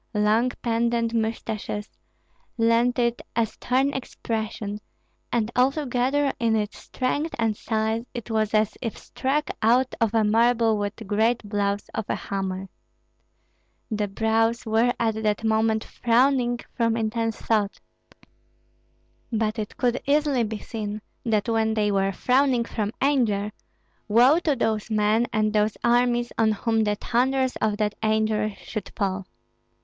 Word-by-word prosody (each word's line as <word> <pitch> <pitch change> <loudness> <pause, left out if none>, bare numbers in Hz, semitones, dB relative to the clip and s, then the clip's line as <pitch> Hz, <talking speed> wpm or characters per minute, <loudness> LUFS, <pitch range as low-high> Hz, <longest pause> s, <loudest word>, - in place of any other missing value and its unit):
Long 215 +4 +3
pendent 235 0 +1
mustaches 220 -2 -2 0.7
lent 230 +2 +3
it 235 -1 +1
a 230 0 +3
stern 260 +5 0
expression, 220 -4 -4 0.5
and 230 -1 0
altogether 270 +1 +1
in 230 -1 +2
its 210 -1 -2
strength 290 +5 -2
and 225 -2 +1
size 220 +1 -1
it 235 -2 -7
was 220 -1 +1
as 215 -1 +2
if 230 -3 -4
struck 285 +3 -2
out 245 +4 +3
of 225 -2 +3
marble 225 0 +3
with 205 0 -2
great 220 +2 +1
blows 200 0 -1
of 220 - -3
a - - +1
hammer. 195 -1 -4 1.2
The 210 -1 0
brows 225 +3 +1
were 225 +2 +3
at 220 -2 0
that 210 0 0
moment 220 0 +2
frowning 245 0 +2
from 230 -1 +1
intense 225 0 -1
thought; 210 -3 0 1.5
but 220 0 0
it 210 - -5
could 245 0 +1
easily 285 -3 +2
be 215 0 -3
seen 210 -1 -5 0.2
that 215 -2 +1
when 220 -1 +1
they 210 -1 +1
were 195 0 +1
frowning 250 +2 +2
from 210 -2 -2
anger, 225 -7 +2 0.6
woe 245 +9 +5
to 310 -5 +1
those 220 -3 -1
men 215 +2 +2
and 215 -1 +1
those 210 0 +1
armies 240 0 +2
on 220 -1 +4
whom 225 +1 +1
the 210 0 +1
thunders 260 +4 +1
of 215 -1 0
that 210 -1 0
anger 215 -1 +1
should 215 -1 -6
fall. 195 -3 -2
225 Hz, 135 wpm, -25 LUFS, 215-240 Hz, 1.5 s, woe